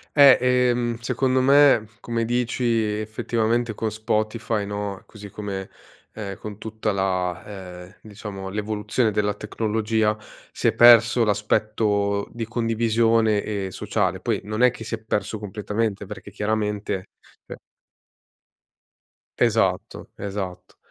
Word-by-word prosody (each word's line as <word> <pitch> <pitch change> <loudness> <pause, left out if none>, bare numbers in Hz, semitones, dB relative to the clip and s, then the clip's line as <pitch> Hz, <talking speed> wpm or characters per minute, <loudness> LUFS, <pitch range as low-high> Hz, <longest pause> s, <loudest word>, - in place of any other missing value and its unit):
Eh, 140 -3 +8
ehm, 125 -2 +2
secondo 130 +2 +1
me 135 -4 +5
come 115 -1 -2
dici 120 +1 -1
effettivamente 115 +1 0
con 110 +1 -2
Spotify, 110 0 -1
no, 100 -1 -4
così 105 -2 -11
come 100 -1 -5 0.4
è 100 -3 -6
con 105 -2 -8
tutta 110 0 -3
la 95 -2 -1 0.4
ehm, 90 - -18
diciamo 100 -2 -8
l'evoluzione 105 +2 -1
della 105 0 0
tecnologia, 110 0 0 0.3
si - - -1
è 115 - +3
perso 120 0 +7
l'aspetto 105 -1 0
di 115 -1 -4
condivisione 115 -1 +2
e 100 -2 -3
sociale. - - -1
Poi - - -1
non 110 +3 -1
è 125 - +6
che 115 - -9
si 115 - -3
è - - -10
perso 110 0 -2
completamente, 105 0 -3
perché 100 0 -9
chiaramente, 105 -2 -2 0.4
ehm - - -8 1.8
Esatto, - - 0
esatto, 95 -2 -6
110 Hz, 120 wpm, -23 LUFS, 105-115 Hz, 1.8 s, Eh